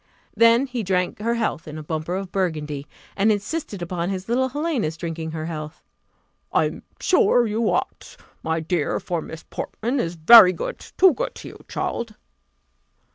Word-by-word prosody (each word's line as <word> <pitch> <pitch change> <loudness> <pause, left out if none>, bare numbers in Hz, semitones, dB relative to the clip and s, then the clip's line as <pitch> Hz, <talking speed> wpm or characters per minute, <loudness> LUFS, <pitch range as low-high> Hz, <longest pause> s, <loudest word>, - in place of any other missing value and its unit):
Then 230 +3 +5
he 250 -3 -4
drank 180 -2 -1
her 230 +2 0
health 220 -9 -2
in 155 0 -7
a 155 - -7
bumper 160 +3 -3
of 190 -1 -5
burgundy, 150 -6 -2 0.3
and 205 +2 +3
insisted 210 - -3
upon 175 0 -3
his 190 -1 -4
little 260 +3 +1
Helena's 270 - -2
drinking 165 -1 -4
her 160 0 -5
health. 155 -2 -7 0.7
"I - - +3
am - - -5 0.2
sure 245 -9 +4
you 220 +1 0
ought, - - -3 0.2
my 160 0 -1
dear, 160 -2 -1
for 170 -2 -3
Miss 160 +1 -9
Portman 245 +5 -3
is 170 -5 -2
very 185 +3 +9
good - - -5
too 375 -2 +3
good - - -4
to - - -9
you, - - -13
child." 230 -2 -3
185 Hz, 170 wpm, -23 LUFS, 160-235 Hz, 0.7 s, very